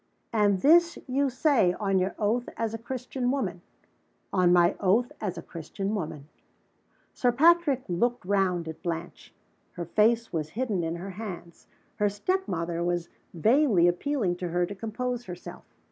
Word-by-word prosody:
"And 205 Hz, -4 st, +3 dB
this 340 Hz, +3 st, +5 dB
you 275 Hz, +1 st, +1 dB
say, 255 Hz, -, +3 dB
on 195 Hz, -1 st, 0 dB
your 185 Hz, +2 st, -1 dB
oath 230 Hz, +3 st, 0 dB
as 225 Hz, -1 st, -2 dB
a 225 Hz, -, -4 dB
Christian 250 Hz, +1 st, -3 dB
woman?" 200 Hz, -10 st, -2 dB, 0.7 s
"On 180 Hz, -2 st, +4 dB
my 175 Hz, -1 st, +4 dB
oath 220 Hz, +7 st, +2 dB
as 200 Hz, -5 st, -3 dB
a -, -, -6 dB
Christian 195 Hz, +5 st, -5 dB
woman." 155 Hz, -7 st, -4 dB, 0.9 s
Sir 245 Hz, -, +2 dB
Patrick 300 Hz, 0 st, +4 dB
looked 235 Hz, +6 st, 0 dB
round 185 Hz, -3 st, +1 dB
at 160 Hz, 0 st, -7 dB
Blanche. 170 Hz, -1 st, -5 dB, 0.4 s
Her 175 Hz, -, -5 dB
face 225 Hz, +6 st, +2 dB
was 155 Hz, -2 st, -2 dB
hidden 220 Hz, -9 st, 0 dB
in 165 Hz, +1 st, -2 dB
her 185 Hz, +3 st, -6 dB
hands. 185 Hz, -4 st, -8 dB, 0.3 s
Her 210 Hz, -1 st, +2 dB
step 370 Hz, -, -1 dB
mother 170 Hz, 0 st, -2 dB
was 175 Hz, -1 st, -1 dB, 0.3 s
vainly 215 Hz, -, +4 dB
appealing 185 Hz, 0 st, 0 dB
to 180 Hz, -, -4 dB
her 175 Hz, +1 st, +1 dB
to 200 Hz, -, -7 dB
compose 240 Hz, +4 st, -4 dB
herself. 180 Hz, -1 st, -9 dB
200 Hz, 160 wpm, -27 LUFS, 175-245 Hz, 0.9 s, this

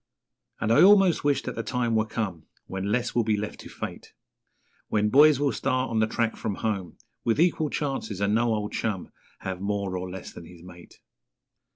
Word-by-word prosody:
And 110 Hz, -, 0 dB
I 115 Hz, -, +6 dB
almost 195 Hz, -2 st, +6 dB
wished 145 Hz, -2 st, +1 dB
that -, -, -3 dB
the 115 Hz, -, -3 dB
time 120 Hz, +1 st, -1 dB
were 110 Hz, 0 st, +1 dB
come 95 Hz, -9 st, -4 dB, 0.2 s
When 95 Hz, +2 st, -4 dB
less 120 Hz, +1 st, 0 dB
will 120 Hz, -, +2 dB
be 110 Hz, -1 st, +1 dB
left 105 Hz, +1 st, -5 dB
to -, -, -10 dB
Fate -, -, -8 dB, 0.7 s
When 105 Hz, 0 st, +1 dB
boys 145 Hz, +3 st, +6 dB
will 145 Hz, -1 st, +2 dB
start 130 Hz, 0 st, -1 dB
on 115 Hz, -, +1 dB
the 110 Hz, -, +3 dB
track 115 Hz, 0 st, -1 dB
from 105 Hz, -3 st, -3 dB
home 100 Hz, -5 st, -3 dB, 0.3 s
With 115 Hz, +4 st, +1 dB
equal 160 Hz, -3 st, +2 dB
chances, 135 Hz, -10 st, -3 dB
and 100 Hz, +1 st, +1 dB
no 115 Hz, +1 st, +2 dB
old 105 Hz, -1 st, -3 dB
chum 100 Hz, -5 st, -3 dB, 0.3 s
Have 95 Hz, -1 st, -5 dB
more 100 Hz, -2 st, -2 dB
or 90 Hz, 0 st, -4 dB
less 95 Hz, 0 st, -8 dB
than 85 Hz, -, -10 dB
his 85 Hz, 0 st, -14 dB
mate. 90 Hz, -1 st, -14 dB
110 Hz, 200 wpm, -26 LUFS, 95-125 Hz, 0.7 s, I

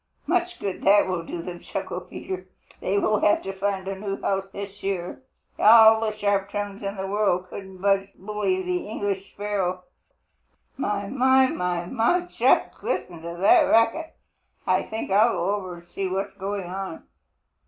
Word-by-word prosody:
"Much 355 Hz, +2 st, 0 dB
good 195 Hz, -2 st, -4 dB
that 205 Hz, +1 st, +5 dB
will 185 Hz, -2 st, -1 dB
do 165 Hz, 0 st, -6 dB
them," 175 Hz, -1 st, -7 dB
chuckled 185 Hz, -1 st, -5 dB
Peter. 185 Hz, 0 st, -6 dB, 0.3 s
"They 195 Hz, -, 0 dB
will 210 Hz, +1 st, +2 dB
have 205 Hz, -, +3 dB
to 195 Hz, -, -4 dB
find 190 Hz, 0 st, -2 dB
a 195 Hz, -, -2 dB
new 195 Hz, 0 st, -4 dB
house 195 Hz, 0 st, -1 dB
this 200 Hz, 0 st, -8 dB
year. 190 Hz, +2 st, -3 dB, 0.4 s
All 220 Hz, 0 st, +8 dB
the 215 Hz, -1 st, -2 dB
sharp 200 Hz, -1 st, +1 dB
tongues 205 Hz, -1 st, -4 dB
in 200 Hz, 0 st, -4 dB
the 190 Hz, -, -3 dB
world 195 Hz, -2 st, 0 dB
couldn't 190 Hz, -1 st, -9 dB
budge 195 Hz, +1 st, +2 dB
Bully 195 Hz, -1 st, -1 dB
the 180 Hz, +1 st, -2 dB
English 200 Hz, -2 st, -3 dB
sparrow. 195 Hz, -3 st, -2 dB, 0.9 s
My, 205 Hz, -6 st, -2 dB
my, 260 Hz, +2 st, +4 dB
my, 180 Hz, -3 st, -2 dB
my, 230 Hz, -, +2 dB
just 355 Hz, -, +1 dB
hear -, -, -1 dB
that 175 Hz, -, +3 dB
racket! 230 Hz, +9 st, +2 dB, 0.5 s
I -, -, +3 dB
think 220 Hz, -2 st, -5 dB
I'll 215 Hz, +4 st, +5 dB
go 190 Hz, +4 st, 0 dB
over 185 Hz, -3 st, -4 dB
and 170 Hz, 0 st, -15 dB
see 195 Hz, -, -3 dB
what 195 Hz, +2 st, -2 dB
is -, -, -27 dB
going 195 Hz, 0 st, -3 dB
on." 195 Hz, -, -6 dB
195 Hz, 170 wpm, -25 LUFS, 185-210 Hz, 0.9 s, All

